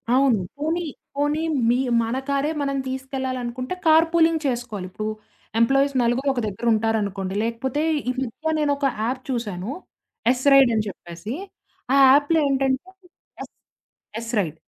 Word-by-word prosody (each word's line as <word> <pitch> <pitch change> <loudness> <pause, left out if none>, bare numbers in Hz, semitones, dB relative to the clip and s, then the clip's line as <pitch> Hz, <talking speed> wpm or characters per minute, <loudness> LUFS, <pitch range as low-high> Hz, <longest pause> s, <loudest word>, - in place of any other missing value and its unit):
అవును. 260 -5 +4 0.2
పోనీ 325 +4 -1 0.3
పోనీ 295 +2 0 0.3
మీ 240 - +3 0.3
మన 230 +3 -2
కారే 280 +2 +1
మనం 275 -1 -1
తీసుకెళ్లాలనుకుంటే, 260 0 -4
కార్ 320 +1 +6
పూలింగ్ 325 -1 +3
చేసుకోవాలి. 235 -7 -3
ఇప్పుడు 215 +3 -5 0.5
ఎంప్లాయిస్ 275 +4 +3
నలుగురు 245 +4 0
ఒక 245 - -2
దగ్గర 205 +4 -6
ఉంటారనుకోండి. 205 -3 -1
లేకపోతే 235 +5 -2 0.3
ఈ - - +3
మధ్య 265 +6 -3
నేనొక 285 -1 +1 0.2
యాప్ 255 +3 -2
చూశాను. 210 -6 -3 0.6
ఎస్ 255 0 -2
రైడ్ 270 -3 +7
అని 215 -1 0
చెప్పేసి. 175 +4 -7 0.6
ఆ - - +5
యాప్‌లో 290 +4 +4
ఏంటంటే 270 +4 0 0.5
ఎస్ - - -12 0.7
ఎస్ 230 0 -6
రైడ్. 160 -5 -2
255 Hz, 135 wpm, -23 LUFS, 225-280 Hz, 0.7 s, రైడ్